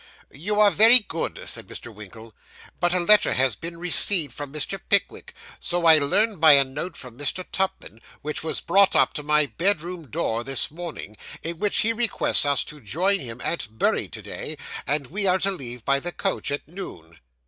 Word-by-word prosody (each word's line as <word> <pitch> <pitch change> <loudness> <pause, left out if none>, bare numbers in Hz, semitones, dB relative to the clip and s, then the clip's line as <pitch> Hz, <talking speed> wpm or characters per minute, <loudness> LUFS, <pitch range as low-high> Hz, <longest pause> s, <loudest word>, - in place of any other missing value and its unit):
'You 205 +9 -2
are 210 -1 +6
very 225 +5 +9
good,' 185 -8 -4
said - - -3
Mr. 120 - -9
Winkle; 110 +2 -12 0.5
'but 175 - +1
a 180 - +1
letter 210 +4 +5
has 130 -3 +1
been 170 +6 -7
received 170 -4 +2
from 145 0 -8
Mr. 155 +6 0
Pickwick 200 -1 -1 0.2
so 175 -1 -1
I 160 -2 +7
learn 200 +8 0
by 155 -1 +7
a 140 -1 +6
note 145 +7 -6
from 125 -3 -10
Mr. 145 +6 -3
Tupman, 185 - -4 0.2
which 150 +1 -3
was 160 - -1
brought 195 +3 +3
up - - +3
to 150 - -4
my 150 0 +2
bedroom 175 -1 -2
door, 115 +2 -2
this 135 +1 0
morning 160 -10 -9 0.3
in 165 0 -5
which 205 -1 +1
he 230 +1 +2
requests 230 -9 +2
us 140 -1 +2
to 150 -1 -9
join 185 - 0
him 120 -3 -8
at 170 - -2
Bury - - 0
to - - -9
day; - - -7 0.3
and 145 0 -1
we 195 +9 -1
are 185 0 +3
to 195 +1 0
leave 125 - -6
by 140 0 +1
the 175 +4 -6
coach 195 -3 -3
at 145 0 -5
noon. 85 - -10
160 Hz, 195 wpm, -23 LUFS, 135-190 Hz, 0.5 s, very